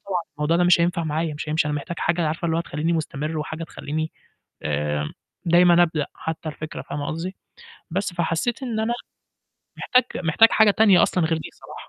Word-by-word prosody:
طبعًا 185 -3 -2 0.2
الموضوع 150 +3 +2
ده 175 - +3
مش 175 -1 +5
هينفع 170 0 +1
معايا 155 0 -1
مش 150 - -6
هيمشي 150 0 +1
أنا 150 - -1
محتاج 165 +4 -5
حاجة 170 0 +1
عارفة 160 +2 -2
اللي 165 -1 +1
هو - - +1
تخلّيني 160 0 -2
مستمر 155 -1 -2
وحاجة 155 +2 -4
تخلّيني 155 +1 -4 0.5
آمم، 75 0 -1 0.3
دايمًا 175 0 +6
أبدأ 160 -3 -1
حتى 160 0 -5
الفكرة 155 0 -7
فاهمة 145 -1 -5
قصدي، 170 +4 -4 0.6
بس 190 +2 -1
فحسّيت 175 +9 -1
إن 235 -4 -2
أنا 225 +2 0 0.8
محتاج 250 0 +3 0.2
محتاج 195 +8 +6
حاجة 220 -1 +5
تانية 200 -3 +5
أصلًا 180 - +1
غير 160 0 +1
دي 160 - -7
صراحة - - -13
165 Hz, 185 wpm, -23 LUFS, 155-175 Hz, 0.8 s, دايمًا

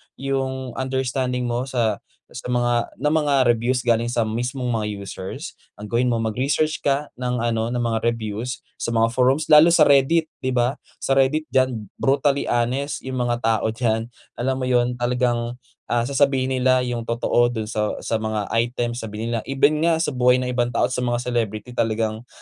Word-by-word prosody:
yung 130 -1 -3
understanding 130 -1 -1
mo 120 +2 -2
sa, 115 -5 0 0.3
sa - - -7
mga 120 -1 +1
na 145 - 0
mga 145 -5 +3
reviews 120 +2 +2
galing 115 0 +2
sa 115 -2 0
mismong 125 +3 -3
mga 105 -2 -2
users, 95 -1 -7 0.2
ang 105 - -7
gawin 120 +3 +1
mo 115 - 0
magresearch 135 +8 0
ka 140 +1 +1
ng 125 0 -2
ano 115 0 -1
ng 120 - -1
mga 115 -2 0
reviews 115 +1 -2 0.2
sa - - -3
mga 115 -1 +3
forums 130 +4 +2
lalo 155 +2 +7
sa 165 -3 +6
Reddit. 145 +4 +4 0.2
'Di 130 - 0
ba, 125 +2 +1 0.2
sa 135 - 0
Reddit 135 +4 +2
diyan 130 -5 0
brutally 140 +1 +1
honest 125 +4 0
yung 130 0 -4
mga 120 -1 0
tao 110 -2 +1
dyan. 115 0 -1 0.2
Alam 130 +2 -1
mo 130 - -2
yun 125 -1 +1
talagang, 120 -1 0 0.3
ah, 120 -1 +1
sasabihin 135 0 +1
nila 130 0 +3
yung 120 -2 -3
totoo 120 +1 +2
dun 110 -3 -4
sa 105 -1 -1
sa 110 - -1
mga 110 -2 -3
item 120 0 -1
sabihin 110 -1 -5
nila. 115 - 0
Even 145 +3 +2
nga 170 -1 +4
sa 155 - 0
buhay 125 -1 +4
ng 125 0 -2
ibang 120 -1 +1
tao - - +2
sa 125 - -1
mga 120 -1 -1
celebrity 115 -2 -2
talagang 110 0 -1
120 Hz, 180 wpm, -22 LUFS, 115-130 Hz, 0.3 s, lalo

